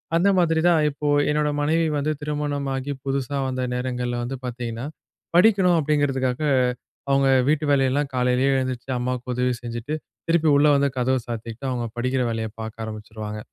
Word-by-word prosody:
அந்த 175 +4 +4
மாதிரி 165 -2 +3
தான், 170 -2 +5
இப்போ 150 +1 -4 0.2
என்னோட 150 0 +1
மனைவி 160 +3 +2
வந்து 145 +2 0
திருமணமாகி 145 -2 -2
புதுசா 135 0 -2
வந்த 130 0 -2
நேரங்கள்ல 125 -1 -2
வந்து 125 +3 -4
பார்த்திங்கன்னா, 120 -1 -4 0.5
படிக்கணும் 185 -2 +5
அப்படிங்கிறதுக்காக 140 -3 0 0.7
அவங்க 135 0 +3 0.2
வீட்டு 155 +1 +2
வேலையெல்லாம் 140 +1 +2
காலையிலேயே 125 +2 +2
எழுந்திரிச்சு 130 -1 -3
அம்மாவுக்கு 125 0 -3
உதவி 125 0 +1
செஞ்சுட்டு, 120 +5 -4 0.3
திருப்பி 165 -1 +3
உள்ள 145 +1 +5
வந்து 140 0 +2
கதவ 130 +1 +2
சாத்திக்கிட்டு, 115 +2 -5
அவங்க 120 -2 -2
படிக்கற 130 +2 0
வேலைய 110 -1 -3
பார்க்க 110 0 -6
ஆரம்பிச்சுடுவாங்க. 110 0 -7
130 Hz, 145 wpm, -23 LUFS, 125-150 Hz, 0.7 s, தான்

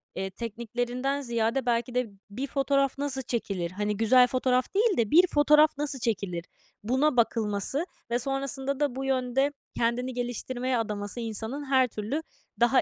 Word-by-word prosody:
eee, 190 +1 -2
tekniklerinden 245 +5 -3
ziyade 235 0 0
belki 240 0 0
de 250 -1 +1 0.2
bir 255 +7 -4
fotoğraf 275 0 +1
nasıl 275 -2 -2
çekilir? 200 -8 -3
Hani, 210 +2 -2
güzel 250 +3 +6
fotoğraf 255 0 +1
değil 425 0 +3
de 225 -3 +1
bir 355 +3 +7
fotoğraf 300 -1 +4
nasıl 290 -2 -1
çekilir? 195 -7 -2 0.4
Buna 260 +5 +2
bakılması 225 - +1 0.3
ve 240 - +2
sonrasında 270 +1 -2
da 290 -4 0
bu 270 +1 -3
yönde 265 +1 +1 0.3
kendini 245 +2 0
geliştirmeye 245 +1 -2
adaması 210 0 -3
insanın 230 +5 -4
her 265 -2 +4
türlü 225 +7 -3 0.4
daha 240 +2 +5
250 Hz, 150 wpm, -28 LUFS, 225-275 Hz, 0.4 s, bir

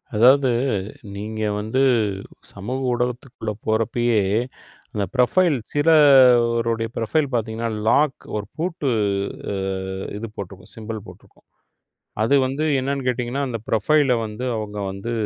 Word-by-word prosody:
அதாவது 130 +4 +5 0.7
நீங்க 110 +2 -5 0.2
வந்து 110 +5 -1 0.7
சமூக 120 +7 -4
ஊடகத்துக்குள்ள 120 -2 -3 0.2
போறப்பயே, 115 +1 +1 0.7
அந்த 105 -1 -1
ப்ரொபைல் 145 +5 +3
சிலருடைய 125 -7 +5
ப்ரொபைல் 145 +7 +1
பாத்தீங்கன்னா, 115 0 -2 0.2
லாக் 145 0 +2 0.2
ஒரு 105 - -4
பூட்டு 165 -4 -2 0.6
அஹ், 95 0 -3
இது 115 +2 -5
போட்டிருக்கும் 95 -1 -9
சிம்பல் 110 -2 -7
போட்டிருக்கும். - - -17 0.8
அது 140 +5 +3
வந்து 140 +4 -2
என்னன்னு 135 0 -2
கேட்டீங்கன்னா 125 +2 -1
அந்த 120 - -3
ப்ரொபைல் 135 +5 +3
வந்து 110 +4 -6
அவங்க 105 -1 -5
வந்து 100 +5 -6
120 Hz, 110 wpm, -22 LUFS, 110-135 Hz, 0.8 s, அதாவது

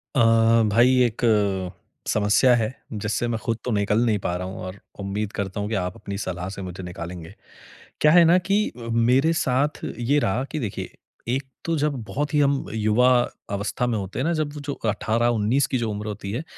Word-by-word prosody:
अ, - - +3 0.5
भाई 120 +4 +5
एक 120 -2 -1 0.9
समस्या 105 +4 +4
है 115 +1 -1 0.2
जिससे 105 +3 -2
मैं 115 - -1
खुद 115 0 -2
तो 125 - -1
निकल 105 0 +1
नहीं 110 -3 +2
पा 90 -2 -2
रहा 90 +1 -4
हूँ 95 - -7
और 95 +2 -7 0.2
उम्मीद 100 +1 -3
करता 100 0 -3
हूँ 105 +1 -2
कि 110 - -1
आप 90 0 -4
अपनी 100 0 -6
सलाह 90 -2 -4
से - - -7
मुझे 90 0 -7
निकालेंगे। 90 0 -7 0.7
क्या 150 - +6
है 175 +1 +7
ना 170 +2 +6
कि 200 +4 +1
अ, 115 -1 -8
मेरे 125 +7 +3
साथ 140 0 0 0.2
ये 125 +5 +2
रहा 120 0 0
कि 155 - -2
देखिए, 110 -8 -4 0.4
एक 130 +4 0 0.2
तो 165 -1 0
जब 150 0 +1
बहुत 145 +3 -3
ही 150 - +3
हम 140 -1 +2
युवा 110 +3 +3 0.4
अवस्था 105 +5 -1
में 115 -2 0
होते 100 +3 -5
हैं 130 - 0
ना, 170 - +1
जब 155 -2 -2
वो 150 - -7
जो 145 0 -4 0.2
18-19 115 +4 +1
की 130 - -1
जो 115 -3 -1
उम्र 105 +1 -5
होती 100 -2 -5
है, 120 +8 -3
115 Hz, 205 wpm, -24 LUFS, 100-135 Hz, 0.9 s, है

